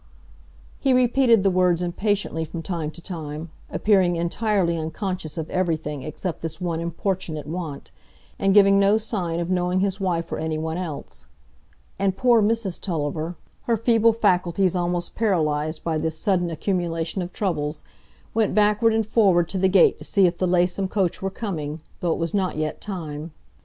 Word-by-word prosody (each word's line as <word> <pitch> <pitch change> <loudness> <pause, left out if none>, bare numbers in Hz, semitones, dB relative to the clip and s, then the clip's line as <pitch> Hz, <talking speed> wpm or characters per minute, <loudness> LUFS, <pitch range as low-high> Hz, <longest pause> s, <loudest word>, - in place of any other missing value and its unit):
He 270 -2 +2
repeated 250 -3 +4
the 195 - +3
words 180 -1 +2
impatiently 185 -2 -1
from 165 +1 -6
time 165 -3 -3
to 170 +2 -10
time, 155 -3 -6 0.2
appearing 190 -4 +3
entirely 170 +1 0
unconscious 160 0 -4
of 160 -1 -3
everything 160 -6 -1
except 155 +5 -5
this 160 0 -5
one 170 -3 -2
importunate 170 -3 -3
want, 160 -2 -6 0.5
and 195 - +3
giving 195 -1 +6
no 200 +2 +4
sign 185 -7 -2
of 175 +1 -2
knowing 180 0 +1
his 195 0 0
wife 175 -3 -1
or - - -2
any 160 0 -2
one 160 +2 -3
else; 145 - -7 0.7
and 195 -1 +1
poor 240 -3 +4
Mrs 210 -3 0
Tulliver, 160 -1 -2 0.3
her 230 -1 +2
feeble 230 0 +4
faculties 185 -3 +2
almost 175 0 -1
paralyzed 155 -7 0
by 160 -2 -1
this 160 0 -2
sudden 180 -2 +1
accumulation 170 0 -2
of 175 0 -5
troubles, 155 -7 -2 0.5
went 220 -3 +1
backward 210 +2 +3
and 225 -1 +1
forward 195 -6 +3
to 190 - -2
the 190 0 +3
gate 190 -1 +5
to - - -9
see 195 -2 +3
if 175 -1 +2
the 185 +1 0
Laceham 180 +2 +2
coach 185 -3 -1
were 195 - -1
coming, 165 -7 -4 0.2
though 175 - 0
it - - 0
was 165 -1 -2
not 190 -5 0
yet 155 0 -3
time. 160 -5 -6
180 Hz, 170 wpm, -23 LUFS, 160-200 Hz, 0.7 s, giving